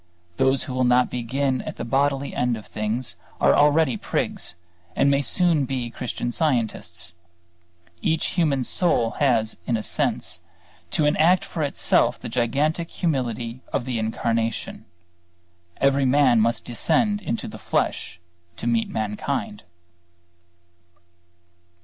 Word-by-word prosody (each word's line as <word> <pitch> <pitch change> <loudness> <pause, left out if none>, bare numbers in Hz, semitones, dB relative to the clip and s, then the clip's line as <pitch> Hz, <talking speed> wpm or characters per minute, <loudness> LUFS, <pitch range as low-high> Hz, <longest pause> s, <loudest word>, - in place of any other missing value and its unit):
Those 130 0 +3
who 130 - -6
will 130 0 +1
not 125 0 +3
begin 130 +2 -1
at - - -6
the - - -5
bodily 140 +3 +1
end 125 -2 +1
of 105 - -10
things 105 +2 -3 0.2
are 70 +1 +5
already 150 -2 +4
prigs - - -2 0.4
and 140 +1 +4
may 140 0 +3
soon 165 -2 +2
be 125 -2 -3
Christian 120 0 -4
Scientists. 110 - -1 0.9
Each 160 -1 +1
human 150 -7 +1
soul 120 -8 +1
has 115 -6 +2
in 120 - +2
a 110 - -4
sense 85 - -2 0.5
to 150 - +1
enact 165 +5 +4
for 165 - -5
itself 145 -2 +2
the - - -6
gigantic 145 +8 0
humility 125 - -2
of - - -1
the 125 -3 -2
Incarnation. 115 -1 -2 0.9
Every 140 0 +3
man 130 -3 +4
must 115 +1 +1
descend 205 - +1
into 115 - -3
the - - -9
flesh 90 - -1 0.4
to - - -6
meet 115 -1 +1
mankind. 105 +1 -3
125 Hz, 130 wpm, -24 LUFS, 115-145 Hz, 0.9 s, are